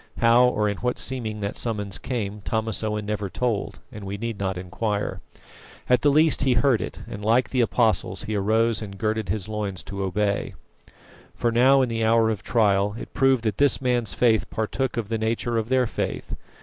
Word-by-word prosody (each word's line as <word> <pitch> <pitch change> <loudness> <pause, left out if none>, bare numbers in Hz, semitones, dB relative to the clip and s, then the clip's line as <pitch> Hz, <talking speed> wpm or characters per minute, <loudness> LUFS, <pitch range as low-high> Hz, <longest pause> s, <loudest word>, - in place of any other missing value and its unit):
How 120 +2 +5
or 105 -4 +1
in 100 -1 -2
what 125 0 -2
seeming 110 -5 -2
that 100 0 -3
summons 105 -4 -3
came 105 -5 -4
Thomas 110 +1 -2
Owen 105 -1 -2
never 105 -1 -3
told, 110 +2 -2
and 105 - -9
we 100 +1 -5
need 115 0 -4
not 95 -2 -2
inquire. 100 +3 -3 0.7
At 125 -1 +3
the 145 - +4
least 155 +2 +4
he 135 -2 +3
heard 125 -2 +3
it, - - -6
and, 105 - -7
like 115 +4 +2
the 130 - +2
Apostles, 110 -5 +1
he 110 - -4
arose 110 +3 +1
and 100 -2 -7
girded 110 0 -1
his 105 -2 -2
loins 105 -5 -4
to 100 0 -6
obey. 100 +2 -1 0.8
For 120 - 0
now, 130 +3 +5
in 125 - -1
the 115 -1 -1
hour 110 0 +3
of 105 -3 -4
trial, 105 -3 +2
it - - -9
proved 135 -3 +3
that 110 -4 -2
this 145 0 +4
man's 125 -4 0
faith 115 -3 +2
partook 120 +4 -2
of 110 -3 -3
the 115 -1 -1
nature 115 +1 -1
of 110 +1 -4
their 130 -1 +3
faith. - - -4
110 Hz, 200 wpm, -24 LUFS, 105-120 Hz, 0.8 s, How